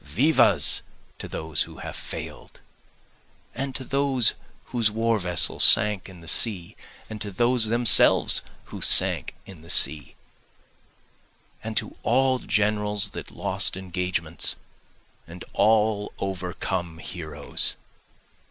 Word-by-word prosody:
Vivas 85 - +1 0.4
to - - -8
those 80 -1 -2
who - - -4
have - - -9
fail'd! - - -10 0.9
And 135 0 -6
to 130 - -6
those 135 -3 +1 0.4
whose 115 -3 +1
war 115 +1 -1
vessels 90 -3 +3
sank 105 -3 +6
in 90 -2 -15
the 85 - -15
sea! 95 -3 -1 0.3
And 110 -1 -10
to 105 - -6
those 120 +3 +1
themselves 120 +1 +5 0.3
who - - -8
sank - - +5
in 95 -5 -14
the 85 - -17
sea! 75 -3 +1 1.5
And 110 -1 -7
to - - -4
all 130 +1 0
generals 105 -2 -1
that - - -9
lost - - -2
engagements, 90 -3 -3 0.7
and 85 +2 -12
all 105 0 0
overcome 90 -3 -5
heroes! 80 -3 -4
100 Hz, 115 wpm, -23 LUFS, 85-115 Hz, 1.5 s, sank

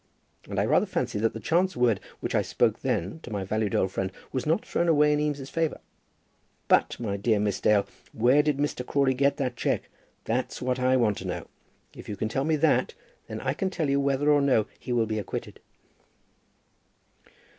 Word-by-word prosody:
And - - -2
I - - +2
rather - - +3
fancy 105 - -2
that 115 +1 +1
the 115 - -6
chance 175 +6 +1
word 120 -5 +3 0.2
which - - -3
I - - +3
spoke - - +1
then 95 - -2
to 160 - -10
my 100 -3 -3
valued 105 +1 -1
old 95 - +1
friend 95 -1 -2 0.2
was 130 +2 -3
not 165 +7 +1
thrown 170 - 0
away 150 -2 +4
in 150 - +1
Eames's 145 -2 -2
favour. 165 -2 -1 0.9
But, - - +3
my 105 -4 -2
dear 105 +1 +1
Miss 105 -1 -1
Dale, 105 -2 +4 0.3
where 125 +6 +4
did 150 -2 0
Mr. 145 -3 -1
Crawley 135 0 +2
get 140 +2 +2
that 130 -3 -2
cheque? - - -1 0.3
That's 120 +3 -2
what 130 0 -1
I 130 +1 +3
want 110 -5 +1
to - - -6
know. - - -4 0.5
If - - -10
you 105 - -3
can 110 +2 -2
tell 135 +5 -1
me 160 0 +2
that, 155 +2 +2 0.3
then - - -6
I - - 0
can 190 - -1
tell 155 -6 -1
you 140 - +2
whether 140 +1 +2
or 145 -1 +4
no 130 -6 +3
he 125 - -6
will 120 -2 +2
be 110 0 -2
acquitted." 100 - -6
130 Hz, 205 wpm, -27 LUFS, 110-145 Hz, 0.9 s, away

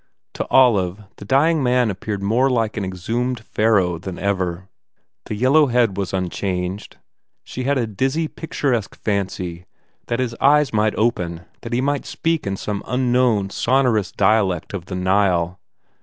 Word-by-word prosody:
To - - -4
Olive 105 -7 +3
the 100 - -10
dying 150 +7 +3
man 125 -3 +2
appeared 100 +1 -5
more 120 +7 +2
like 115 -4 0
an 105 - -2
exhumed 115 +7 -2
Pharaoh 105 -6 +1
than 90 +1 -7
ever. 95 -2 -2 0.6
The - - -4
yellow 135 +7 +4
head 120 -5 +2
was 100 -1 -3
unchanged. 90 +1 -3 0.5
She 130 - -6
had 140 +1 +2
a 120 - +1
dizzy, 135 +9 -1
picturesque 135 -9 -2
fancy 95 -4 -3 0.4
that 120 - -1
his 125 -2 -1
eyes 145 -1 +4
might 105 0 +2
open, 90 -7 -1 0.2
that 115 - -7
he 120 - +1
might 145 +1 -1
speak 165 -7 -1
in 95 0 -2
some 105 0 -4
unknown, 125 -5 +1
son 135 +6 +2
orous 110 -6 +1
dialect 100 -4 +1
of 90 -4 -5
the 95 - -6
Nile. 90 -1 +1
105 Hz, 155 wpm, -21 LUFS, 95-125 Hz, 0.6 s, yellow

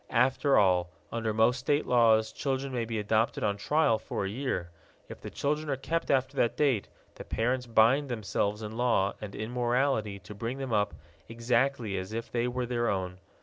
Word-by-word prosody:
After 130 +3 +3
all, 90 -3 +3 0.2
under 115 -1 -1
most 110 +4 +3
state 145 +3 +1
laws, 110 -3 +4
children 135 -1 -2
may 120 -2 -1
be 115 0 -3
adopted 110 +2 0
on 100 -1 +1
trial 115 +1 +2
for - - -4
a - - -2
year. 105 -7 -3 0.4
If - - -10
the - - -6
children 150 +2 -2
are 135 - +1
kept 165 +5 -2
after 130 -1 +1
that 120 - +1
date, 135 -9 +2 0.3
the - - -9
parents 125 +2 -1
bind 120 +5 +4
themselves 105 -2 -2
in 105 - -5
law 115 -4 +1
and 105 -2 -7
in 110 +2 -5
morality 120 -4 0
to 95 +2 -11
bring 115 +5 -4
them 135 -3 -4
up 105 -1 +1 0.3
exactly 115 -2 0
as 95 +3 -7
if 115 +1 -5
they 120 0 0
were 125 0 -2
their 120 -1 0
own. 95 -2 -3
115 Hz, 190 wpm, -29 LUFS, 105-130 Hz, 0.4 s, laws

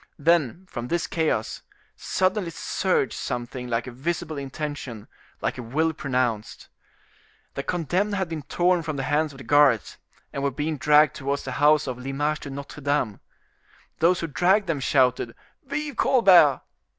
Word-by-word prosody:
Then, 165 +1 +1
from 120 -8 -6
this 170 +5 0
chaos, 155 -10 -1 0.3
suddenly 185 -1 0
surged 175 -2 -1
something 125 0 -4
like 115 -1 -1
a 130 - -7
visible 155 +5 -3
intention, 140 -5 -6 0.3
like - - -2
a - - -3
will 155 +8 0
pronounced. 125 -8 -2 0.8
The - - -3
condemned 180 +6 -1
had 190 -2 -1
been 165 -2 -5
torn 175 +5 +1
from 155 -2 -4
the 135 - -2
hands 150 +3 +1
of 135 - -13
the 135 - -10
guards, 140 -4 +3 0.4
and 140 - -3
were 140 - +1
being 150 +3 -3
dragged 150 +2 +5
towards 140 +1 -2
the 130 - -5
house 150 +1 +5
of 125 -2 -5
L'Image 145 +4 -2
de 140 - -8
Notre 140 +2 -8
Dame. 140 -7 0 0.8
Those 170 +2 +3
who - - -1
dragged 180 +7 +2
them 165 -5 -1
shouted, 125 -3 +1 0.3
"Vive 295 +1 -3
Colbert!" 180 - +5
145 Hz, 160 wpm, -25 LUFS, 130-170 Hz, 0.8 s, dragged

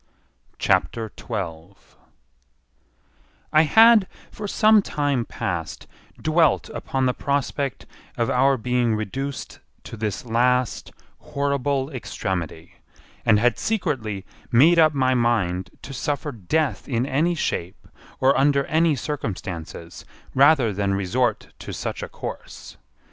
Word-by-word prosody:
CHAPTER 115 -2 0
12 95 -4 -7 1.6
I 155 - +7
had 220 +4 +6 0.2
for 210 - -6
some 215 +1 +5
time 145 -9 -1
past, 80 -8 -4 0.3
dwelt 155 -1 +2
upon 135 -1 -2
the 125 - +2
prospect 140 -3 -2 0.3
of 115 - +1
our 135 +3 +3
being 120 -1 +1
reduced 130 +6 -5 0.2
to - - -8
this 105 0 -4
last 125 +1 +1 0.3
horrible 140 0 -1
extremity, 95 - -5 0.5
and 110 - +6
had 120 +2 +2
secretly 110 - -2 0.3
made 160 +8 +6
up 155 -2 +5
my 130 -1 +2
mind 105 -7 0
to 135 - -8
suffer 145 +3 -2
death 140 - -2
in 120 -1 0
any 155 +6 +1
shape 90 - -3 0.3
or 135 +1 +4
under 140 0 +3
any 160 -1 +2
circumstances 90 - -6 0.3
rather 135 -5 +4
than 100 0 0
resort 110 +4 -1
to - - -7
such - - -4
a - - -6
course. - - -8
125 Hz, 115 wpm, -23 LUFS, 105-145 Hz, 1.6 s, I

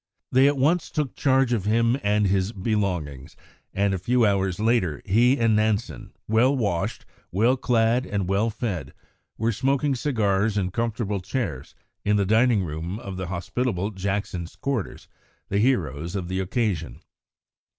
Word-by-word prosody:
They 130 +2 +5
at 145 0 +1
once 160 +6 +2
took 150 -5 -2
charge 135 -2 +2
of 105 -5 -1
him 115 +3 +3
and 105 -1 +2
his 95 +2 +1
belongings, 90 - -2 0.4
and 100 0 +1
a 95 - -2
few 120 +5 +2
hours 95 -3 +1
later 110 - +1
he 120 +7 +4
and 115 -2 +3
Nansen, 110 -1 -1 0.2
well 125 +6 +3
washed, 100 -8 -2 0.3
well 115 +8 +3
clad, 120 0 +1
and 100 -3 -2
well 100 +4 +1
fed, 105 - -4 0.4
were 115 +2 +1
smoking 135 +5 +1
cigars 110 -6 0
in 95 -2 0
comfortable 110 -2 -2
chairs 90 - -4 0.3
in 105 0 +2
the 100 -1 +2
dining 110 0 +3
room 85 +4 -4
of 100 -5 -7
the 95 -1 -4
hospitable 95 +3 -2
Jackson's 95 -3 -3
quarters, 135 -8 -4 0.4
the 100 - +1
heroes 85 - 0
of 90 -3 -3
the 95 0 -1
occasion. 95 - -2
105 Hz, 150 wpm, -24 LUFS, 95-120 Hz, 0.4 s, They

